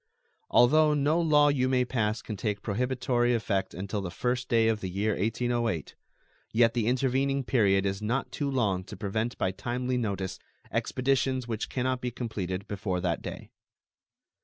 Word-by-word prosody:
Although 150 +4 +5
no 150 +4 +2
law 150 -3 +5
you 130 -3 +1
may 125 -1 +2
pass 110 -3 -1
can 110 - -5
take 105 0 -3
prohibitory 125 +2 +1
effect 100 -4 -1
until 100 +3 -3
the 95 - -4
first 125 +6 -2
day 115 -1 +4
of 110 -2 +1
the 95 - -3
year 100 +4 0
1808, 115 - -1 0.6
yet 115 0 +4
the 115 -3 0
intervening 135 +2 +1
period 100 -6 +3
is 95 +1 -1
not 120 +5 -1
too 145 -2 -2
long 105 -9 0
to 105 - -9
prevent 110 +4 -2
by 95 - 0
timely 125 +5 -2
notice 100 -5 -3 0.3
expeditions 130 -1 0
which 110 -2 -3
can 125 - -2
not 130 0 0
be 125 - -1
completed 100 -6 -4
before 100 -3 -2
that 90 -2 -1
day. - - -8
115 Hz, 165 wpm, -28 LUFS, 100-130 Hz, 0.6 s, Although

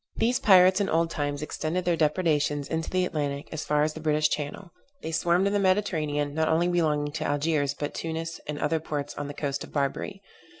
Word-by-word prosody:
These 245 +2 +1
pirates 185 0 +6
in 195 - 0
old 165 +1 +1
times 145 -1 -2
extended 165 +4 -2
their 175 -1 +2
depredations 150 -3 +1
into 160 0 -2
the 185 0 +1
Atlantic 145 -3 -3
as 155 -1 -4
far 150 0 +2
as 155 0 0
the 160 - -8
British 155 -1 +2
Channel. 150 +5 -4 0.3
They 160 - -3
swarmed 175 +3 +2
in 200 - +1
the 205 - +2
Mediterranean, 155 -7 +1
not 160 +1 +1
only 165 +2 +2
belonging 155 -4 +1
to 155 +1 -4
Algiers, 145 -1 0
but 145 0 -4
Tunis, 165 0 -4
and 150 0 -3
other 160 +2 0
ports 145 -2 -4
on 145 - -5
the 145 - -7
coast 140 -1 -3
of - - -11
Barbary. 155 +8 -2
155 Hz, 210 wpm, -27 LUFS, 145-175 Hz, 0.3 s, pirates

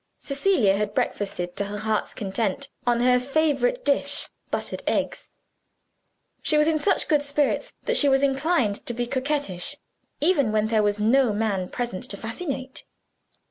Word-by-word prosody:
Cecilia 275 - +2
had 210 0 -2
breakfasted 180 -3 -2
to 200 - 0
her 205 +1 -5
heart's 215 0 -1
content 215 +6 -2 0.2
on 240 -1 +3
her 250 0 +4
favorite 315 - +1
dish 280 0 +1 0.2
buttered - - -3
eggs. - - -1 1.1
She 305 - +2
was 300 - +5
in 320 -1 +2
such 395 +5 +1
good 300 -3 +3
spirits 290 0 0
that - - +1
she 285 - +5
was 270 0 +3
inclined 270 -6 +1
to 240 - -2
be 240 +1 -1
coquettish, 260 -7 -2 0.4
even 295 -8 +3
when 215 0 +1
there 220 -1 +3
was 205 0 +1
no 235 +2 +3
man 205 -4 -1
present 240 -6 -3
to 200 - -6
fascinate. 260 - -5
250 Hz, 155 wpm, -25 LUFS, 210-290 Hz, 1.1 s, was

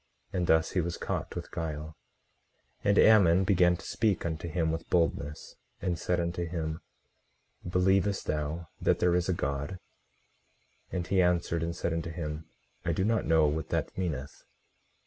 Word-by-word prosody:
And 90 -2 0
thus 80 0 +3
he 90 - +1
was 85 0 -3
caught - - -3
with - - -6
guile. 80 -1 -4 0.9
18:24 - - +1
And 100 - +4
Ammon 95 -5 +6
began 90 -2 +4
to - - -12
speak 105 -6 0
unto 80 0 -3
him 80 0 0
with 80 0 -5
boldness, 80 -4 -1 0.2
and 85 -2 -2
said 90 -1 0
unto 85 0 -1
him: 80 -2 -3 0.9
Believest 95 +2 +2
thou 75 +2 -3
that - - +3
there 90 -1 +2
is 90 +1 +1
a - - +3
God? 70 +1 -2 1.2
18:25 - - -17
And 90 -2 -1
he 95 +1 +3
answered, 85 -2 +1
and 85 0 -2
said 85 0 -1
unto 80 0 -2
him: 80 -2 -5 0.3
I 85 - 0
do 95 - 0
not 115 0 +1
know 80 -1 +5
what 75 +1 -1
that - - -2
meaneth. 75 -7 -4
85 Hz, 170 wpm, -29 LUFS, 80-90 Hz, 1.2 s, Ammon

